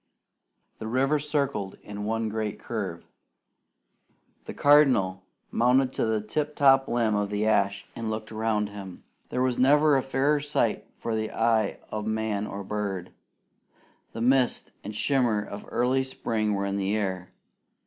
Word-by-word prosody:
The 110 Hz, -, -5 dB
river 135 Hz, +6 st, +2 dB
circled 140 Hz, -9 st, -2 dB
in 105 Hz, 0 st, -6 dB
one 115 Hz, +1 st, -1 dB
great 110 Hz, -1 st, -3 dB
curve. -, -, -5 dB, 1.4 s
The -, -, -6 dB
Cardinal 130 Hz, -11 st, +4 dB, 0.3 s
mounted 125 Hz, +2 st, +3 dB
to -, -, 0 dB
the 110 Hz, -1 st, 0 dB
tip 150 Hz, +8 st, -3 dB
top 135 Hz, -1 st, +5 dB
limb 115 Hz, -2 st, +1 dB
of 105 Hz, -1 st, 0 dB
the 105 Hz, +1 st, -1 dB
ash 100 Hz, -2 st, +1 dB
and 115 Hz, -1 st, -4 dB
looked 110 Hz, 0 st, -4 dB
around 110 Hz, -1 st, 0 dB
him. 100 Hz, -3 st, -9 dB, 0.3 s
There 125 Hz, -, 0 dB
was 130 Hz, -2 st, 0 dB
never 145 Hz, +3 st, +5 dB
a 135 Hz, -, +3 dB
fairer 135 Hz, +3 st, +1 dB
sight 145 Hz, +1 st, -1 dB
for 115 Hz, -, -3 dB
the 110 Hz, 0 st, -2 dB
eye 110 Hz, -2 st, +1 dB
of 105 Hz, 0 st, -3 dB
man 110 Hz, -1 st, -1 dB
or 100 Hz, 0 st, -6 dB
bird. 100 Hz, -3 st, -4 dB, 1.0 s
The 115 Hz, -, -5 dB
mist 130 Hz, +1 st, +2 dB
and 105 Hz, +1 st, -6 dB
shimmer 120 Hz, -4 st, +1 dB
of 100 Hz, +1 st, -8 dB
early 125 Hz, +2 st, +1 dB
spring 110 Hz, -5 st, -1 dB
were 100 Hz, 0 st, -1 dB
in 100 Hz, 0 st, -1 dB
the 100 Hz, +2 st, 0 dB
air. 95 Hz, -3 st, -3 dB
110 Hz, 155 wpm, -27 LUFS, 105-130 Hz, 1.4 s, top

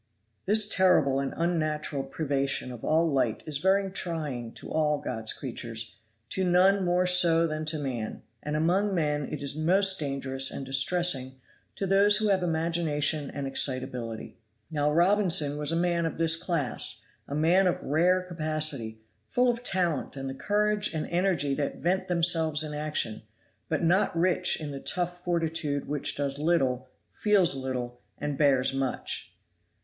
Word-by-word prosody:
This 210 Hz, +1 st, +3 dB
terrible 155 Hz, -9 st, +3 dB
and 135 Hz, 0 st, -2 dB
unnatural 155 Hz, -4 st, -1 dB
privation 135 Hz, -2 st, -1 dB
of 120 Hz, -2 st, -10 dB
all 160 Hz, 0 st, +2 dB
light 125 Hz, -5 st, 0 dB
is 150 Hz, -3 st, -1 dB
very 195 Hz, +2 st, +2 dB
trying 150 Hz, -11 st, -3 dB
to -, -, -10 dB
all 150 Hz, -1 st, +1 dB
God's 110 Hz, -5 st, -2 dB
creatures, 115 Hz, -3 st, -6 dB, 0.3 s
to 190 Hz, -, -1 dB
none 185 Hz, +2 st, +4 dB
more 180 Hz, +1 st, +2 dB
so 170 Hz, -2 st, +5 dB
than 155 Hz, -1 st, -3 dB
to 155 Hz, 0 st, +1 dB
man, 125 Hz, -7 st, -5 dB, 0.2 s
and 150 Hz, 0 st, -4 dB
among 190 Hz, +6 st, +1 dB
men 150 Hz, -3 st, -1 dB
it 150 Hz, -, -5 dB
is 140 Hz, -, -1 dB
most 190 Hz, +5 st, +3 dB
dangerous 135 Hz, -2 st, 0 dB
and 135 Hz, -, -5 dB
distressing 135 Hz, 0 st, +2 dB, 0.4 s
to 195 Hz, -, -3 dB
those 200 Hz, +2 st, +4 dB
who 215 Hz, 0 st, +1 dB
have 190 Hz, -2 st, +2 dB
imagination 160 Hz, -3 st, 0 dB
and 140 Hz, -1 st, -5 dB
excitability. 130 Hz, -5 st, -3 dB, 0.3 s
Now 150 Hz, -1 st, +1 dB
Robinson 170 Hz, -4 st, +2 dB
was 150 Hz, +1 st, -1 dB
a -, -, 0 dB
man 170 Hz, -1 st, +1 dB
of -, -, -6 dB
this 165 Hz, 0 st, +3 dB
class, 165 Hz, -7 st, -2 dB, 0.3 s
a 140 Hz, -, -5 dB
man 175 Hz, +5 st, +3 dB
of 180 Hz, -, -1 dB
rare 180 Hz, +5 st, +2 dB
capacity, 155 Hz, -10 st, -3 dB, 0.3 s
full 250 Hz, -, +2 dB
of 235 Hz, 0 st, -6 dB
talent 175 Hz, -, -1 dB
and 135 Hz, 0 st, -5 dB
the 135 Hz, -, -4 dB
courage 210 Hz, +5 st, 0 dB
and 155 Hz, -, -2 dB
energy 170 Hz, -6 st, +1 dB
that 140 Hz, 0 st, -2 dB
vent 185 Hz, +2 st, -1 dB
themselves 165 Hz, -3 st, +2 dB
in 150 Hz, -1 st, -5 dB
action, 150 Hz, -7 st, -2 dB, 0.5 s
but 155 Hz, +1 st, -1 dB
not 175 Hz, +1 st, +2 dB
rich 180 Hz, +1 st, +2 dB
in 150 Hz, -2 st, -5 dB
the 140 Hz, -, -6 dB
tough 175 Hz, +3 st, -3 dB
fortitude 160 Hz, -4 st, -2 dB
which 145 Hz, -1 st, -1 dB
does 140 Hz, -1 st, 0 dB
little, 135 Hz, -6 st, 0 dB, 0.2 s
feels 200 Hz, -8 st, +2 dB
little 125 Hz, -2 st, -5 dB, 0.2 s
and 145 Hz, -1 st, -3 dB
bears 135 Hz, -3 st, +3 dB
much. 135 Hz, -1 st, -3 dB
155 Hz, 160 wpm, -27 LUFS, 140-180 Hz, 0.5 s, so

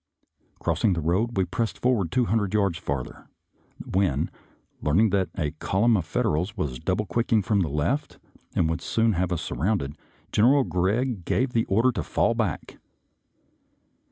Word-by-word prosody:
Crossing 90 Hz, +5 st, +1 dB
the 85 Hz, -, -1 dB
road, 95 Hz, +9 st, 0 dB
we 95 Hz, -, +3 dB
pressed 110 Hz, +6 st, -2 dB
forward 115 Hz, -10 st, +1 dB
two 125 Hz, -2 st, +2 dB
hundred 105 Hz, -3 st, 0 dB
yards 100 Hz, -4 st, +1 dB
farther, 70 Hz, -6 st, -5 dB, 0.6 s
when, 95 Hz, 0 st, 0 dB, 0.5 s
learning 95 Hz, +8 st, +3 dB
that 95 Hz, -2 st, +1 dB
a 75 Hz, -5 st, -1 dB
column 110 Hz, +9 st, +1 dB
of 90 Hz, -6 st, 0 dB
Fed -, -, -1 dB
erals 90 Hz, +8 st, -1 dB
was 70 Hz, -9 st, -3 dB
double 105 Hz, -, -1 dB
quicking 110 Hz, +3 st, +1 dB
from 100 Hz, +1 st, +1 dB
the 85 Hz, -5 st, 0 dB
left 75 Hz, -, -1 dB, 0.4 s
and 80 Hz, -, +2 dB
would 80 Hz, +1 st, -2 dB
soon 115 Hz, +4 st, +1 dB
have 90 Hz, 0 st, -1 dB
us 85 Hz, -, -1 dB
surrounded. 85 Hz, -8 st, -1 dB, 0.4 s
General 130 Hz, +6 st, +4 dB
Gregg 105 Hz, +3 st, 0 dB
gave 125 Hz, +8 st, 0 dB
the 115 Hz, -1 st, +2 dB
order 115 Hz, +6 st, +3 dB
to 105 Hz, -7 st, -3 dB
fall -, -, +1 dB
back. -, -, -3 dB
95 Hz, 160 wpm, -25 LUFS, 85-115 Hz, 0.6 s, General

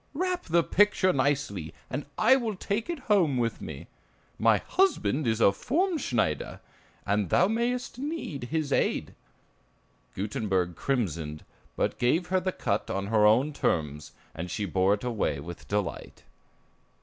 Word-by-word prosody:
Wrap 365 Hz, +2 st, -1 dB
the 170 Hz, 0 st, +3 dB
picture 205 Hz, -1 st, +3 dB
nicely, 130 Hz, -, -1 dB
and 145 Hz, +2 st, -5 dB
I 230 Hz, +5 st, +6 dB
will 230 Hz, -5 st, -1 dB
take 205 Hz, -, -3 dB
it 345 Hz, -, -2 dB
home 185 Hz, -, +2 dB
with 115 Hz, -1 st, -1 dB
me. -, -, -7 dB, 0.5 s
My -, -, +5 dB
husband 155 Hz, -, +1 dB
is 110 Hz, -1 st, +1 dB
a 100 Hz, -, +6 dB
formschneider, 250 Hz, -, -1 dB, 0.5 s
and 100 Hz, -2 st, 0 dB
thou 180 Hz, -, +4 dB
mayst 240 Hz, +3 st, -1 dB
need 280 Hz, -, -4 dB
his 150 Hz, +1 st, -1 dB
aid." -, -, 0 dB, 1.0 s
Gutenberg 95 Hz, -3 st, -1 dB
crimsoned, 85 Hz, -, -2 dB, 0.3 s
but -, -, -1 dB
gave 165 Hz, +9 st, +1 dB
her 185 Hz, 0 st, +3 dB
the 185 Hz, +1 st, -1 dB
cut 100 Hz, -, -2 dB
on 100 Hz, 0 st, -2 dB
her 105 Hz, -1 st, +6 dB
own 130 Hz, +8 st, +3 dB
terms, 75 Hz, -, -1 dB, 0.2 s
and 90 Hz, +3 st, -5 dB
she 105 Hz, -, -2 dB
bore 95 Hz, +2 st, +2 dB
it 105 Hz, -, -12 dB
away 115 Hz, -, -1 dB
with 85 Hz, +3 st, -9 dB
delight. 105 Hz, -1 st, -3 dB
130 Hz, 145 wpm, -28 LUFS, -, 1.0 s, I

